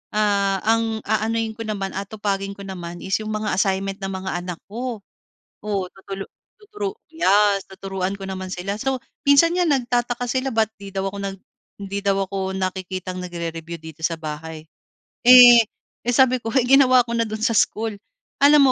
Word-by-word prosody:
ah, 200 -2 +1
ang 225 0 +1
aanuhin 220 +1 0
ko 225 +1 -7
naman, 195 -3 -3
aatupagin 200 0 -3
ko 200 - -10
naman 175 -3 -7
is 190 +2 0
yung 215 0 -5
mga 215 0 -2
assignment 195 +1 0
ng 195 0 -4
mga 190 0 -4
anak 180 -2 -6
ko. 235 -2 -5 0.6
Oo, 205 -3 -1
tutulu 195 0 -7 0.3
tuturu 420 -1 -5 0.2
yes, 205 - +3
tuturuan 190 0 -4
ko 195 - -8
naman 190 -1 -5
sila. 195 +3 -3
So, 265 +1 -1 0.3
minsan 285 +4 +6
nga 360 -1 +2
nagtataka 245 -3 0
sila 260 +2 0
ba’t 220 -1 +2
'di 200 -1 -9
daw 195 0 -1
ako 200 - -8
nag 195 0 -4 0.4
hindi 200 0 -4
daw 195 -1 +2
ako 190 0 -3
nakikitang 185 -1 -4
nagre-review 170 -1 -5
dito 160 0 -11
sa 165 - 0
bahay. 155 0 -6 0.6
Eh, 245 -1 +10 0.5
eh 245 - +2
sabi 255 0 +4
ko, 230 - -8 0.2
ginawa 255 -1 +6
ko 235 - -5
na 230 - +2
doon 215 0 -5
sa 235 - +3
school. 220 +1 +1 0.5
Alam 285 -2 +7
200 Hz, 170 wpm, -22 LUFS, 190-235 Hz, 0.6 s, Eh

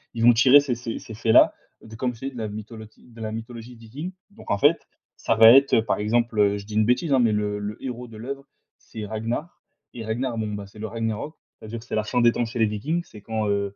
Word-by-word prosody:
ils 115 - -2
vont 120 +1 +8
tirer 130 +5 +7
ces 135 -4 -2
ces 115 -1 -5
ces 110 - -10
faits-là 110 0 +5 0.3
de 110 0 -11
comme 125 +2 -2
je - - -17
t'ai 135 - -3
dis, - - -16
de 120 - -5
la 110 - -2
mytholotie 110 +1 -10
de 115 -1 -13
la 110 -1 -4
mythologie 115 +2 -8
Viking 125 +10 -8 0.2
donc 210 - -9
en 100 - +2
fait, 150 +7 +3 0.3
ça 115 - 0
va 115 +1 +9
être, 135 +2 +6
heu, 115 - +2
par - - 0
exemple, 105 -2 +1
je 100 - -9
dis 105 - -10
une 110 0 +3
bêtise, 140 +6 +1
hein, 135 - +4
mais 115 -3 +3
le 105 -1 -1
le 105 +1 -5
héros 125 -1 -5
de 115 -2 -12
l'œuvre, 135 +5 -6 0.3
c'est 110 -1 -8
Ragnar 115 - -4 0.3
et 115 - -7
Ragnar, 120 +2 -2
bon, 110 -1 -3
bah, 105 -1 -5
c'est 105 +2 -16
le 110 - -4
Ragnarok. 115 +6 -4 0.2
C'est-à-dire 110 +2 -7
que 115 - -15
c'est - - -9
la 110 - +1
fin 125 +2 0
des 120 0 +6
temps 120 - -1
chez 120 +2 -7
les 110 - +5
Vikings, 145 +12 -2
c'est 105 - -14
quand, 110 0 -2
heu, 100 0 -1
115 Hz, 265 wpm, -24 LUFS, 110-125 Hz, 0.3 s, va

